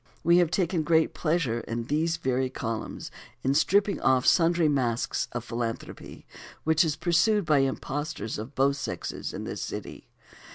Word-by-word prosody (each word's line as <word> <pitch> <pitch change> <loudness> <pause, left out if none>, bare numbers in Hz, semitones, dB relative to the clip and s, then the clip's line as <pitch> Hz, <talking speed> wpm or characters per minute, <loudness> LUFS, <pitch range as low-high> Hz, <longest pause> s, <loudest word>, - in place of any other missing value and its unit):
We 170 +1 +5
have 175 -3 +3
taken 175 -1 0
great 160 0 +2
pleasure 155 -8 0
in 115 0 -4
these 160 +6 0
very 130 -4 0
columns 115 -3 -5 0.3
in 135 - +2
stripping 200 +7 +2
off 130 -1 +3
sundry 170 -1 +4
masks 125 -5 0
of 120 -1 -4
such - - -17
philanthropy 115 -1 -5 0.4
which 160 +1 +3
is 155 -3 0
pursued 175 +5 +2
by 150 -2 +4
impostors 135 -2 -2
of 115 +6 -8
both 140 +1 +2
sexes - - -5
in - - -6
this - - -5
city. - - -7
150 Hz, 160 wpm, -27 LUFS, 125-165 Hz, 0.4 s, We